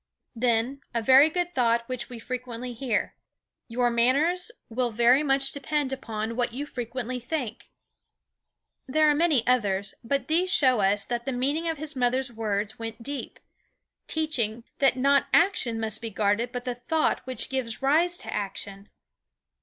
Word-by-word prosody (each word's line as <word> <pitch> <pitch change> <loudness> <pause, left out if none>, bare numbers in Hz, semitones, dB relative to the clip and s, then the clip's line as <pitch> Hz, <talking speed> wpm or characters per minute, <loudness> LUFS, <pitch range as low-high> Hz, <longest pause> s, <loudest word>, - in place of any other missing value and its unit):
" - - -53
Then, 240 +4 +1
a 230 - +1
very 265 +5 +7
good 350 +1 -2
thought 235 -2 +1
which 255 -2 -5
we 245 - -8
frequently 250 0 -5
hear: 235 -3 -1 0.5
"Your 240 +1 +1
manners 290 - +2 0.2
will 245 +1 -1
very 240 +4 +4
much 275 -2 +2
depend 285 -1 -2
upon 225 -3 -4
what 240 -1 0
you 280 +4 -4
frequently 250 -1 -5
think." 245 -2 -5 1.2
There 310 +4 +3
are - - +3
many 295 -6 +2
others, 205 -6 +1
but 270 +2 -1
these 355 +4 +1
show 255 -8 +5
us 200 +1 +2
that 240 +1 -4
the - - +1
meaning 285 +7 0
of 325 - -2
his 305 0 -5
mother's 255 0 0
words 215 -1 -2
went 225 0 -6
deep, 280 +2 -5 0.7
teaching 240 -8 -1 0.2
that 270 -2 +4
not 280 +1 +3
action 325 - +2
must 220 -1 -2
be 230 - -4
guarded 215 +3 0
but 245 -1 -5
the 250 -1 -2
thought 245 +7 0
which 255 -4 -2
gives 260 -2 -3
rise 335 +6 +3
to - - -6
action. 200 0 -5
250 Hz, 160 wpm, -26 LUFS, 230-280 Hz, 1.2 s, very